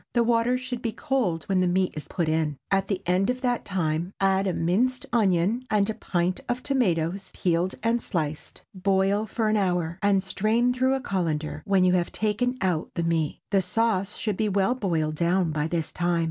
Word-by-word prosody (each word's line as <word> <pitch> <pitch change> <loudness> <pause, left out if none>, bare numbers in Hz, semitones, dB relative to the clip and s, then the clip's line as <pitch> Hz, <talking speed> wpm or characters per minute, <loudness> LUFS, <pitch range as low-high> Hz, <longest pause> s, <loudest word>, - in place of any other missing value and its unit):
The 235 - +4
water 235 +1 +2
should 250 -1 -5
be 230 -3 -2
cold 240 - -1
when 190 -1 0
the 185 - +2
meat 185 +1 +1
is 150 - -7
put 170 -3 -2
in. 155 -2 0
At 195 0 +2
the 195 -1 -2
end 185 +4 +2
of 250 0 -1
that 245 -2 0
time, 170 -1 -1
add 195 0 +2
a 185 - 0
minced 225 +11 0
onion 205 +1 +2
and 205 -2 +2
a - - -4
pint 180 -2 -1
of 245 +1 -2
tomatoes 190 - 0
peeled 175 +1 0
and 230 +1 +1
sliced. 155 -7 -4
Boil 195 +2 +1
for 220 +2 -1
an 215 0 +2
hour, 175 -3 0
and 200 -2 +3
strain 220 +6 +1
through 260 +1 +2
a 265 - -3
cullender 165 - -2
when 195 -3 +3
you 180 0 +4
have 175 -1 +1
taken 230 +4 0
out 180 -5 0
the 170 - -1
meat. 165 -2 -1
The 195 -2 +4
sauce 200 +1 0
should 210 -4 -2
be 215 -1 +1
well 200 +4 +2
boiled 165 -10 -1
down 175 0 +2
by 150 0 -1
this 165 -1 -2
time. 175 -1 0
190 Hz, 200 wpm, -26 LUFS, 170-225 Hz, -, The